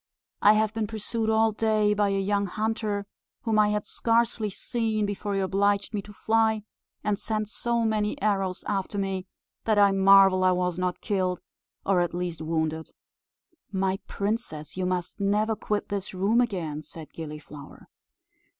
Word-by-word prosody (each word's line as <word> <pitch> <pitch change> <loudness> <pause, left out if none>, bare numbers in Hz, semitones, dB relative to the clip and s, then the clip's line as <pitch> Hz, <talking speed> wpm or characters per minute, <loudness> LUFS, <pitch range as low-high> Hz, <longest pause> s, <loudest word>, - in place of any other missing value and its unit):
I 210 - +7
have 215 0 +1
been 225 -1 -1
pursued 220 +1 -2
all 220 0 +4
day 215 -1 +2
by 205 -1 +2
a 195 - 0
young 200 +1 0
hunter, 215 0 -2 0.4
whom 220 -2 +2
I 210 0 +5
had 210 0 -1
scarcely 230 -2 +1
seen, 220 +1 -1
before 205 0 -3
he - - +1
obliged 200 +2 +1
me 205 - -1
to 205 - -13
fly; 220 +1 +1 0.4
and 205 -1 0
sent 215 -1 -2
so 235 +1 -1
many 215 -2 0
arrows 195 -3 0
after 200 0 -2
me 195 -1 -2 0.4
that 215 -2 +2
I 200 -1 +6
marvel 195 -1 +6
I 185 0 +5
was 180 -1 -1
not 180 -1 -1
killed, 185 -3 0 0.5
or 195 -2 +3
at 175 0 -1
least 175 -2 -3
wounded." 160 0 -2 0.8
"My 190 0 0
princess, 200 -7 -3
you 185 0 -1
must 180 +2 -3
never 210 +2 +1
quit 210 -1 -2
this 195 -2 -4
room 205 +6 +3
again," 170 -10 -2
said 155 0 -11
Gilliflower. 150 -2 -9
200 Hz, 160 wpm, -27 LUFS, 185-215 Hz, 0.8 s, I